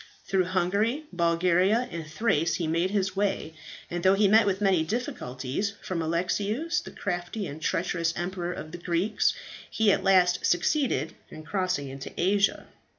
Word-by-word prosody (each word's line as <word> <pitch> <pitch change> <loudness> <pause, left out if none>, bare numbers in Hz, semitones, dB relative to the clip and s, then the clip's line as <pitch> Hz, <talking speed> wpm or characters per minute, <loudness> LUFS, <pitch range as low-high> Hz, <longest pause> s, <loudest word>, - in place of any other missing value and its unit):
"Through 190 -2 +1
Hungary, 200 - 0
Bulgaria, 180 +6 +2
and 165 -2 -6
Thrace 165 -1 +1
he 175 - -2
made 165 +3 +1
his 195 -1 -1
way; 195 -5 -1 0.3
and 175 0 -4
though 190 +2 +5
he 205 +1 +4
met 215 +1 +5
with 195 -1 +1
many 190 -5 +3
difficulties 160 - -3
from 180 -3 -3
Alexius, 205 - -1
the - - -9
crafty 180 +2 -4
and 155 -1 -7
treacherous 170 -1 0
Emperor 175 0 -3
of 155 -3 -7
the 175 - -7
Greeks, 175 +4 +1 0.3
he 220 -2 +3
at - - +1
last 180 -2 +4
succeeded 175 - +1 0.2
in 155 - -10
crossing 180 -4 -1
into 135 0 -7
Asia. 200 +2 +2
180 Hz, 155 wpm, -27 LUFS, 170-200 Hz, 0.3 s, though